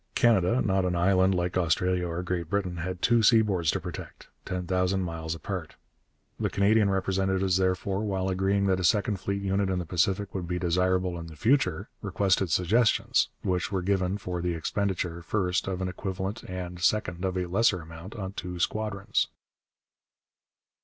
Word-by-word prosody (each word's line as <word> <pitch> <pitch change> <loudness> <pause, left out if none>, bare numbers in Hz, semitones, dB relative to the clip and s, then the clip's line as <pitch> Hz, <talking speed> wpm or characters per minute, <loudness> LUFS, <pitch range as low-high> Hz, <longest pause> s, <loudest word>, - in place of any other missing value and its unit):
Canada, 115 0 +3
not 95 -2 +1
an 90 -1 0
island 95 +1 +3
like 90 0 -1
Australia 90 +1 +1
or 85 +1 -3
Great 85 -2 -3
Britain, 95 -3 -1
had 90 +2 -4
two 120 0 +4
seaboards 105 -7 +4
to - - +1
protect, - - -8 0.2
ten 90 0 -3
thousand 90 +1 +1
miles 85 -2 -4
apart. 80 - -5 0.6
The - - 0
Canadian 100 +1 +3
representatives, 95 -1 +1
therefore, 95 +1 0
while 95 -3 -1
agreeing 95 +1 +1
that 95 -1 +2
a - - -2
second 105 +4 +2
fleet 100 +1 -3
unit 95 0 +1
in 95 - 0
the 90 - -3
Pacific 95 +4 0
would 90 -3 -4
be 90 +1 -2
desirable 90 0 +1
in 85 - -7
the 80 - -11
future, 110 - +1
requested 95 -2 +1
suggestions, 105 +8 +2
which 90 -1 -1
were 95 -3 -1
given, 95 0 +1
for 90 -3 -4
the 85 -1 -1
expenditure, 90 0 -2
first, 90 +1 -1
of 95 -1 -2
an - - -1
equivalent 95 +3 -4
and, 90 -1 -6
second, 90 -3 +1
of 95 -1 -1
a 90 - 0
lesser 95 +1 +2
amount 80 +5 -10
on 95 -3 -5
two 90 -2 -5
squadrons. 105 +2 0
95 Hz, 170 wpm, -27 LUFS, 90-100 Hz, 0.6 s, two